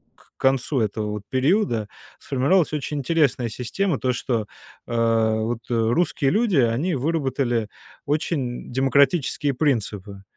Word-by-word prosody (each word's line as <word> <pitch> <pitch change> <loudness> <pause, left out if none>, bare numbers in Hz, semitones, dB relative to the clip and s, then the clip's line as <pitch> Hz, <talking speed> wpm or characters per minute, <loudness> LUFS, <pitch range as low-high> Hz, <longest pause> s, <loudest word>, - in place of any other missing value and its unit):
к - - -26
концу 135 0 +1
этого 105 0 -2
вот 105 -1 -5
периода 130 - +1 0.3
сформировалась 155 +5 +1
очень 150 0 -3
интересная 140 -4 +1
система: 130 - -2
то, 130 -1 0
что, 115 -3 -1 0.4
э, 115 -1 +2
вот, 115 +1 -2
э, - - -1
русские 120 +5 +1
люди, 215 -5 +2
они 130 +8 +2
выработали 130 -6 -1 0.4
очень 145 -4 -2
демократические 140 +2 +2
принципы. 105 -8 -2
130 Hz, 120 wpm, -23 LUFS, 115-150 Hz, 0.4 s, э